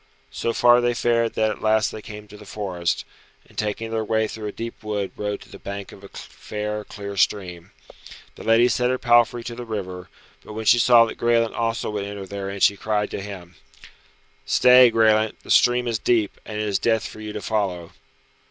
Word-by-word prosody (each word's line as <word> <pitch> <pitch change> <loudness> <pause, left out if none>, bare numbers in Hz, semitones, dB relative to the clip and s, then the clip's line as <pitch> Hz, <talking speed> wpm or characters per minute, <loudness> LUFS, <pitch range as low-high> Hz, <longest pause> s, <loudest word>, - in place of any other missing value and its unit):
So 115 - -2
far 120 +1 +5
they 120 0 0
fared 115 -1 +1
that 110 -1 +1
at - - -8
last 110 0 +2
they 110 - -8
came 105 -1 -10
to 105 - -13
the 105 - -12
forest, 95 -4 -3 0.4
and - - -22
taking 110 +1 -3
their 110 -1 -1
way 110 +1 0
through 110 0 -7
a - - -4
deep 115 +2 -7
wood 105 -2 -3
rode 105 -1 -4
to - - -15
the - - -12
bank 100 0 -7
of 100 - -14
a - - -10
fair, 105 0 -6
clear 100 -1 -8
stream. 90 -3 -1 0.6
The - - -12
lady 115 +2 +4
set 125 0 +1
her 130 - 0
palfrey 120 -1 +3
to 120 - -6
the 120 +1 -7
river, 95 -5 -6 0.3
but - - -10
when 110 +1 -5
she 120 - +5
saw 120 -1 +6
that 115 - -8
Graelent 115 -1 +2
also 115 -1 -2
would 105 -1 -3
enter 100 -1 -6
therein 100 0 -6
she 100 - +5
cried 105 0 -1
to - - -4
him, 95 -3 -10 0.9
"Stay, 125 0 +6
Graelent, 110 -1 +2
the - - -6
stream 125 0 +4
is 115 -2 -1
deep, 110 -4 0
and 105 - -6
it 105 - -1
is 100 -2 0
death 110 -1 +1
for 110 - -11
you 105 0 -6
to 105 - -5
follow." 95 -6 -2
110 Hz, 210 wpm, -23 LUFS, 100-115 Hz, 0.9 s, saw